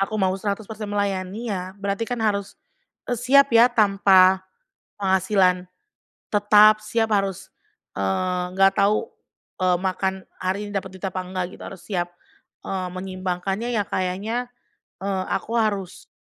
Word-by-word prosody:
Aku 215 +2 -1
mau 190 -2 +2
100% 210 +1 -4
melayani 205 +2 -2
ya, 185 0 -5
berarti 200 +3 -3
kan 245 - -2
harus, 200 -2 -1 0.5
eee, 245 - -2
siap 275 +2 +5
ya 230 +1 +7
tanpa 195 -4 +5 0.6
penghasilan 190 -1 +2 0.6
tetap, 210 +1 +6
siap 225 +1 0
harus, 195 -2 -2 0.5
eee, 180 - 0
nggak 195 0 +5
tahu, 205 +2 +2 0.6
eee, 180 -1 +3
makan 190 0 -1 0.3
hari 195 +3 -2
ini - - -9
dapat 190 -1 -2
duit 190 - -6
apa 185 0 -4
nggak 185 0 -3
gitu. - - -11
Harus 190 -2 -9
siap, 175 -3 -1 0.6
eee, 185 -1 -3
menyeimbangkannya 190 +4 -3
ya 215 - +2
kayaknya, 200 +7 -2 0.6
eee, 190 -2 -1
aku 230 - -4
harus, 200 -4 -2
195 Hz, 135 wpm, -23 LUFS, 185-215 Hz, 0.6 s, ya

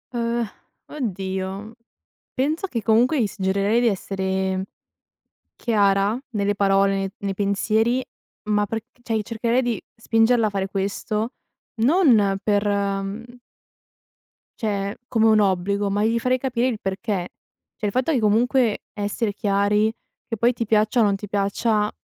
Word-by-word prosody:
Uhm, 235 -1 0 0.4
oddio, 195 -3 -4 0.6
penso 305 +8 0
che 235 - -3
comunque 240 +7 +3
gli - - +3
suggerirei 200 +3 +1
di 245 - +3
essere 190 -2 -1 0.9
chiara 205 0 +2
nelle 205 -2 0
parole, 195 0 +3
ne 195 0 -2
nei 200 -1 -3
pensieri, 220 +5 +1 0.5
ma 210 0 +2
perch 225 +2 -4 0.2
cioè, 230 - -3
i 215 - 0
cercherei 230 +3 0
di 240 -5 -1 0.2
spingerla 225 0 +3
a - - -1
fare 195 -1 -2
questo 205 +4 -2 0.5
non 235 - +4
per, 205 -1 +1
mhmm 200 +4 -2 1.2
cioè, 200 -2 -2
come 225 -2 +2
un 220 -1 +5
obbligo, 200 +1 +1
ma 205 +1 0
gli 230 +1 +2
farei 255 +2 +1
capire 255 -1 0
il 235 -5 -2
perché. 195 -2 -3 0.5
Cioè, - - -5
il 205 - 0
fatto 255 +8 +1
che 275 - +2
comunque 230 +2 +2
essere 205 +1 -2
chiari, 205 +1 +2 0.4
che 225 - -3
poi 235 +4 +3
ti 230 -1 -3
piaccia 215 +2 +2
o - - +6
non 200 -2 +3
ti 205 +1 -7
piaccia, 210 +2 0
210 Hz, 145 wpm, -23 LUFS, 200-235 Hz, 1.2 s, o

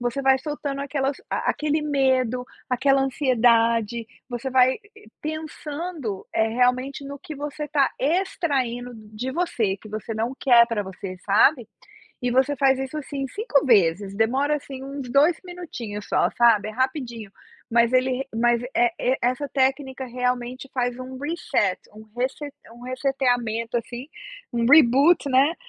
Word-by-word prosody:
você 245 +2 -2
vai 265 -1 +4
soltando 290 -1 -4
aquelas 280 0 -1
a - - 0
aquele 305 +1 0
medo, 260 -4 +1 0.2
aquela 270 +2 +3
ansiedade. 235 -4 +2 0.2
Você 245 +2 -4
vai 260 0 +4 0.5
pensando, 310 - -5
eh, 220 - +2
realmente, 250 +4 0
no 280 +1 -6
que 310 -1 -9
você 295 +1 -5
tá 280 -1 +3
extraindo 275 -7 -1
de 215 +4 -6
você, 250 - -1
que 215 +2 -14
você 215 +2 -5
não 230 +4 -2
quer 240 -3 +6
para 230 -3 -2
você, 190 -1 -7
sabe. 225 +5 +4 0.5
E 245 - 0
você 265 +3 +2
faz 270 0 +3
isso, 265 +3 -4
assim, 275 -2 -4
5 395 - 0
vezes, 195 -3 +3
demora, 265 +8 +1
assim, 270 -2 -8
uns 275 -2 -6
2 300 +5 +4
minutinhos 250 - -7
só, - - +2
sabe, 230 -3 +4
é - - -4
rapidinho, 245 -4 -3 0.4
mas 235 +1 +4
ele 255 +1 +1
mas, 235 +1 +2
eh, 360 +1 +4
e 260 +1 +2
essa 255 +4 0
técnica 265 0 0
realmente 250 +1 -3
faz 245 -1 -1
um 255 0 -7
reset, 285 - -1 0.2
um 215 - -12
rese 255 +2 0 0.4
um 240 +1 -14
reseteamento 245 -3 -1
assim, 240 +2 -7 0.5
um 235 -1 0
reboot, 285 +3 +6
né, 275 +5 +4
255 Hz, 145 wpm, -24 LUFS, 235-280 Hz, 0.5 s, quer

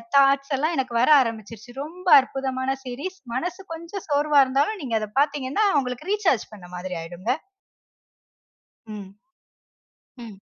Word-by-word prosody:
Thoughts 275 0 +4
எல்லாம் 315 +4 0
எனக்கு 255 -3 -2
வர 255 - +3
ஆரம்பிச்சுருச்சு. 230 0 -5
ரொம்ப 360 +4 -10
அற்புதமான 265 0 -3
சீரிஸ், 285 +10 -6 0.2
மனசு 360 +7 -3
கொஞ்சம் 335 +4 -7
சோர்வா 290 0 +4
இருந்தாலும், 285 +11 0
நீங்க 230 -4 0
அத 215 -1 -5
பார்த்தீங்கனா 290 +6 0
உங்களுக்கு 250 +7 -5
ரீசார்ஜ் 360 - +1
பண்ண 180 -4 -11
மாதிரி 180 0 -5
ஆயுடுங்க. 175 +7 -4 1.6
ம். 205 -3 -7 1.1
ம். 220 -4 -10
265 Hz, 125 wpm, -24 LUFS, 230-305 Hz, 1.6 s, Thoughts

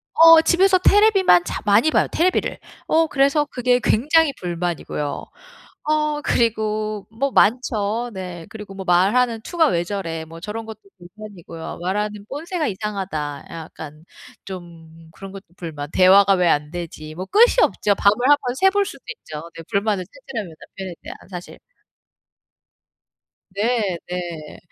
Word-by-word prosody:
어 330 0 +8
집에서 370 +2 +4
테레비만 390 - +4
자 - - -4
많이 210 +10 +4
봐요, - - +2
테레비를. 360 +3 0 0.3
어 325 0 +3
그래서 280 +1 +2
그게 245 0 +1
굉장히 300 +6 +3
불만이고요. 170 -4 -4 0.6
어 300 -1 0
그리고 215 -3 -1
뭐 270 +4 -2
많죠. 230 0 +1
네. 180 -3 -7
그리고 210 -3 -10
'뭐 190 -1 -7
말하는 220 +6 +2
투가 330 +4 +1
왜 170 -7 0
저래.' 170 -4 -5
뭐 165 +1 -11
저런 215 +4 -6
것도 220 -1 -9 0.2
불만이고요. 175 -3 -10
'말하는 205 +2 -3
본새가 320 +3 -3
이상하다.' 190 -8 -4
약간 160 -1 -10 0.4
좀 165 -3 -11
그런 195 -1 -10
것도 195 0 -11
불만 150 -4 -7
'대화가 195 +2 +6
왜 180 -1 +2
안 150 -1 +1
되지?' 155 -3 -7
뭐 185 - -5
끝이 470 +5 +5
없죠. 205 -1 +1
밤을 200 +1 +3
한번 255 -4 +2
새 385 - +5
볼 405 +1 +1
수도 - - -10
있죠 150 -1 -9
네 165 - -9
불만을 200 -2 0
찾으려면 225 - -8
남편에 190 -2 -9
대한 - - -9
사실. 180 -2 -9 1.9
네 205 -2 -1
네. 170 -4 -6
200 Hz, 290 characters per minute, -21 LUFS, 175-255 Hz, 1.9 s, 어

